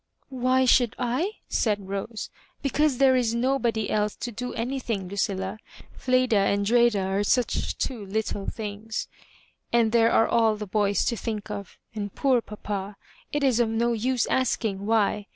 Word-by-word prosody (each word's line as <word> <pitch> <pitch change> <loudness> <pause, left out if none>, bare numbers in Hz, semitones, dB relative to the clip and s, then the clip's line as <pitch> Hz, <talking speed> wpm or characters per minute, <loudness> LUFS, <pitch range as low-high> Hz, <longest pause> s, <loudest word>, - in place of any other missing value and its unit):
"Why 260 0 +2
should 245 -2 +4
I?" 260 - -1
said 205 -4 0
Rose; 200 +3 -5 0.3
"because 285 0 +2
there 265 -1 +5
is 235 -2 +1
nobody 235 -3 0
else 210 0 0
to 240 - -5
do 250 +3 -5
anything, 230 -5 -3
Lucilla. 195 +1 -2 0.3
Fleda 255 -3 +2
and 200 0 +2
Dreda 235 -1 +4
are 195 +2 0
such 245 +3 0
two 240 -6 -3
little 205 0 -3
things; 215 0 -4 0.6
and 235 -2 +3
there 230 0 +4
are 225 - +4
all 225 -2 +3
the 210 0 -5
boys 205 -1 +1
to 235 - 0
think 215 -1 -4
of, 200 -2 -7 0.2
and 205 -2 -5
poor 260 -4 +3
pap& 205 -2 -6 0.3
It 295 -1 -1
is 255 -4 +3
of 235 -2 +3
no 235 +1 +1
use 245 +2 0
asking 215 -6 -1
why. 210 -2 +1
225 Hz, 160 wpm, -26 LUFS, 205-250 Hz, 0.6 s, there